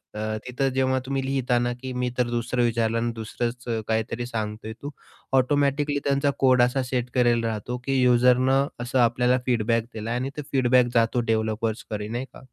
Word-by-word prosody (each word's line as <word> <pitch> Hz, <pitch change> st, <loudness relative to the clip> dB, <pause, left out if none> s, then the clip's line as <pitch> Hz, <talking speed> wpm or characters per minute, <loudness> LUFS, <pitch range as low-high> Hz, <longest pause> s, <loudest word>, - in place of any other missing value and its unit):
अ, -, -, -5 dB, 0.3 s
तिथं 130 Hz, +2 st, 0 dB
जेव्हा 130 Hz, 0 st, +2 dB
तुम्ही 135 Hz, 0 st, -2 dB
लिहिता 130 Hz, -2 st, 0 dB
ना 120 Hz, 0 st, 0 dB
की 130 Hz, -, -5 dB
मी 125 Hz, 0 st, -1 dB
तर 125 Hz, -1 st, +1 dB
दुसरं 120 Hz, +1 st, -1 dB
विचारलं 115 Hz, -1 st, 0 dB
आणि 120 Hz, 0 st, -1 dB
दुसरंच 120 Hz, +2 st, -4 dB
अ, 115 Hz, -1 st, 0 dB
काहीतरी 110 Hz, +2 st, -1 dB
सांगतोय 110 Hz, -2 st, -5 dB
तू, 145 Hz, -, -5 dB, 0.5 s
ऑटोमॅटिकली 145 Hz, +2 st, +1 dB
त्यांचा 140 Hz, 0 st, +2 dB
कोड 130 Hz, -2 st, +5 dB
असा 125 Hz, +2 st, +1 dB
सेट 125 Hz, -1 st, -2 dB
करायला 120 Hz, -2 st, +3 dB
राहतो, 115 Hz, +3 st, -3 dB
की 135 Hz, -1 st, +1 dB
यूजरनं 125 Hz, +2 st, +4 dB
असं 125 Hz, +2 st, -1 dB
आपल्याला 125 Hz, +2 st, +3 dB
फीडबॅक 115 Hz, -1 st, +1 dB
दिलाय 115 Hz, +2 st, -3 dB
आणि 130 Hz, +2 st, -2 dB
तो -, -, -2 dB
फीडबॅक 125 Hz, -2 st, +4 dB
जातो 115 Hz, +1 st, +3 dB
डेव्हलपर्सकडे 110 Hz, -1 st, -2 dB
नाही 120 Hz, +4 st, -4 dB
का -, -, -12 dB
125 Hz, 175 wpm, -25 LUFS, 115-130 Hz, 0.5 s, कोड